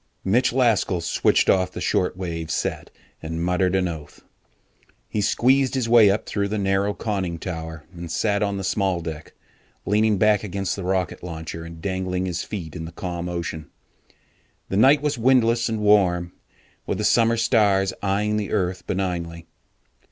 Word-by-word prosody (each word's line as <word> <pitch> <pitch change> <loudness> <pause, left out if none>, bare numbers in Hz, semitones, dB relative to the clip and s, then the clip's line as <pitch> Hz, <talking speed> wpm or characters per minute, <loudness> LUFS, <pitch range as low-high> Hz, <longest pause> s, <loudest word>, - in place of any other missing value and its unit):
'" - - -45
Mitch 125 +2 +3
Laskell 115 -8 +2
switched 85 +1 +2
off 95 -1 +3
the - - -6
short 90 0 0
wave 85 -3 -4
set - - -2 0.3
and 80 +1 -3
muttered 90 +1 +1
an 95 -1 +1
oath. 80 -4 -8 0.8
He 105 - -2
squeezed 130 +6 +2
his 130 -3 0
way 115 -3 +7
up 100 +2 0
through 100 -1 -1
the 105 +2 -2
narrow 100 +1 0
conning 95 -6 -2
tower 80 -2 -6
and 85 -2 -8
sat 100 -1 0
on 100 -1 0
the 95 - -4
small 95 -2 0
deck, 80 -2 -7 0.5
leaning 105 +1 +2
back 105 +1 +3
against 100 -1 -2
the 100 - -6
rocket 90 -1 -1
launcher 80 -1 -6
and 85 -1 -10
dangling 95 -1 -2
his 90 -2 -2
feet 85 -6 -6
in 80 -2 -5
the 80 - -8
calm 85 0 -5
ocean. 85 -3 -5 1.0
The 95 - -1
night 140 +6 +5
was 145 -4 -1
windless 115 -1 +3
and 110 -1 -2
warm, 90 -4 +3 0.5
with - - -1
the - - -2
summer 115 0 +3
stars 105 -5 +2
eyeing 105 +2 0
the 105 -1 -3
earth 90 -3 -1
benignly. 85 -3 -3
95 Hz, 170 wpm, -23 LUFS, 85-105 Hz, 1.0 s, way